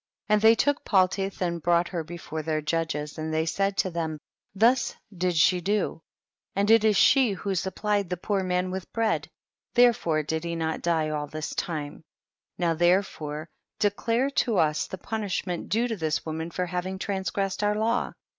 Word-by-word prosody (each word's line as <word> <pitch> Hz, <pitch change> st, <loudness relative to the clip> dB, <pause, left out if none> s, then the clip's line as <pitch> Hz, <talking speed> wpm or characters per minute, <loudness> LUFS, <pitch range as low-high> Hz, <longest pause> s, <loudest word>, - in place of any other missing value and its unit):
34. -, -, +4 dB
And 210 Hz, -, +4 dB
they 225 Hz, +1 st, +7 dB
took 285 Hz, +4 st, +1 dB
Paltitli 190 Hz, -1 st, +1 dB
and 170 Hz, -1 st, -2 dB
brought 170 Hz, +1 st, +2 dB
her 170 Hz, -3 st, -3 dB
before 160 Hz, -1 st, -6 dB
their 155 Hz, 0 st, -1 dB
judges, 150 Hz, -1 st, -2 dB
and 160 Hz, 0 st, -3 dB
they 160 Hz, 0 st, +1 dB
said 195 Hz, +3 st, 0 dB
to 185 Hz, -, +1 dB
them, 160 Hz, -2 st, -3 dB, 0.4 s
thus 235 Hz, +5 st, +3 dB, 0.2 s
did 180 Hz, 0 st, 0 dB
she 175 Hz, +3 st, +4 dB
do, 200 Hz, -3 st, -1 dB, 0.5 s
and 200 Hz, +2 st, +2 dB
it 225 Hz, -1 st, +6 dB
is 215 Hz, -2 st, +4 dB
she 260 Hz, -7 st, +5 dB
who 195 Hz, +1 st, -3 dB
supplied 200 Hz, +1 st, -1 dB
the 180 Hz, -, -2 dB
poor 200 Hz, +2 st, -1 dB
man 180 Hz, 0 st, -1 dB
with 190 Hz, -1 st, -6 dB
bread, 225 Hz, -1 st, 0 dB, 0.5 s
therefore 220 Hz, -11 st, +4 dB
did 160 Hz, +2 st, -2 dB
he 170 Hz, 0 st, -3 dB
not 160 Hz, -1 st, -2 dB
die 160 Hz, -2 st, +1 dB
all 150 Hz, -1 st, -2 dB
this 155 Hz, +1 st, -5 dB
time; 150 Hz, -3 st, -4 dB, 0.5 s
now 170 Hz, -2 st, +1 dB
therefore 160 Hz, -3 st, 0 dB, 0.3 s
declare 230 Hz, +6 st, +1 dB
to 235 Hz, -6 st, +1 dB
us 150 Hz, -2 st, +2 dB
the 190 Hz, -, -6 dB
punishment 190 Hz, -3 st, -3 dB
due 230 Hz, +3 st, +1 dB
to 225 Hz, -, -2 dB
this 160 Hz, -3 st, -1 dB
woman 160 Hz, +1 st, -4 dB
for 180 Hz, +2 st, -2 dB
having 180 Hz, +2 st, -3 dB
transgress 195 Hz, 0 st, -2 dB
ed -, -, -1 dB
our 210 Hz, -, +1 dB
law. 230 Hz, +3 st, 0 dB
180 Hz, 185 wpm, -26 LUFS, 160-205 Hz, 0.5 s, they